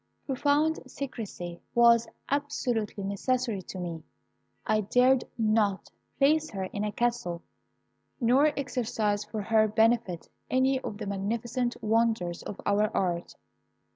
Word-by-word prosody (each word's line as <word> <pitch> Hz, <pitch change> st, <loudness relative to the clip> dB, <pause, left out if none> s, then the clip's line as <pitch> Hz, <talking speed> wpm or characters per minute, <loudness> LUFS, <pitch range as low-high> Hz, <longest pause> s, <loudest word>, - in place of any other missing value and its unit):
"Profound 290 Hz, +4 st, +2 dB
secrecy 215 Hz, -11 st, -6 dB
was 235 Hz, -1 st, +6 dB, 0.2 s
absolutely 245 Hz, -8 st, -1 dB
necessary 225 Hz, +2 st, -1 dB
to 185 Hz, -, -9 dB
me. 170 Hz, -3 st, -5 dB, 0.6 s
I 215 Hz, 0 st, +2 dB
dared 250 Hz, +5 st, +3 dB
not 215 Hz, -3 st, +1 dB, 0.3 s
place 310 Hz, +3 st, +3 dB
her 195 Hz, -3 st, -4 dB
in 205 Hz, +2 st, -4 dB
a 210 Hz, -, -1 dB
castle, 225 Hz, -7 st, -1 dB, 0.8 s
nor 260 Hz, +4 st, +4 dB
exercise 225 Hz, -6 st, -1 dB
for 210 Hz, 0 st, -5 dB
her 220 Hz, 0 st, +4 dB
benefit 220 Hz, -4 st, +1 dB, 0.2 s
any 260 Hz, +1 st, +2 dB
of 205 Hz, -, -6 dB
the 215 Hz, -, -5 dB
magnificent 230 Hz, +5 st, -2 dB
wonders 220 Hz, -6 st, +1 dB
of 205 Hz, -, -7 dB
our 205 Hz, +1 st, +2 dB
art. 175 Hz, -2 st, -1 dB
225 Hz, 120 wpm, -28 LUFS, 200-250 Hz, 0.8 s, was